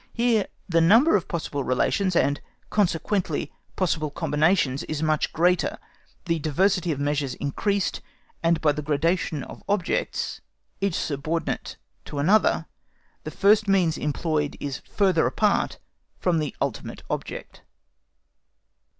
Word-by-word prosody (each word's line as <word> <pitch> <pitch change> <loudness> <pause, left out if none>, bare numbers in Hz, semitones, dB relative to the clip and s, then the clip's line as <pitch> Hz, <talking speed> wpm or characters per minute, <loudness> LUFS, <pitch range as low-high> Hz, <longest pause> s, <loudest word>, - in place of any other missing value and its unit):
Here 230 -3 +2 0.2
the 165 -2 +3
number 225 - +6
of 190 -3 0
possible 150 -4 -3
relations, 180 +9 +1
and 145 -3 +2 0.3
consequently 185 -3 0 0.2
possible 160 -4 0
combinations, 150 -1 +1
is 155 0 -3
much 155 -1 +1
greater, 180 +2 +2 0.5
the 165 -2 0
diversity 175 +3 +1
of 145 - -3
measures 145 -2 -1
increased, 200 +8 -1 0.4
and 165 0 +2
by 150 - +4
the 150 +1 -3
gradation 155 +1 0
of - - -10
objects, 200 -4 -1 0.4
each 195 -4 0
subordinate 155 +3 -2 0.3
to 145 - -7
another 190 +10 +3 0.6
the - - -3
first 210 +2 +3
means 185 -5 +3
employed 150 0 -1
is 140 -2 -4
further 190 -5 +2
apart 210 -2 +1 0.4
from 175 -3 +1
the 150 -3 -3
ultimate - - -4
object. - - -5
165 Hz, 125 wpm, -25 LUFS, 150-195 Hz, 0.6 s, number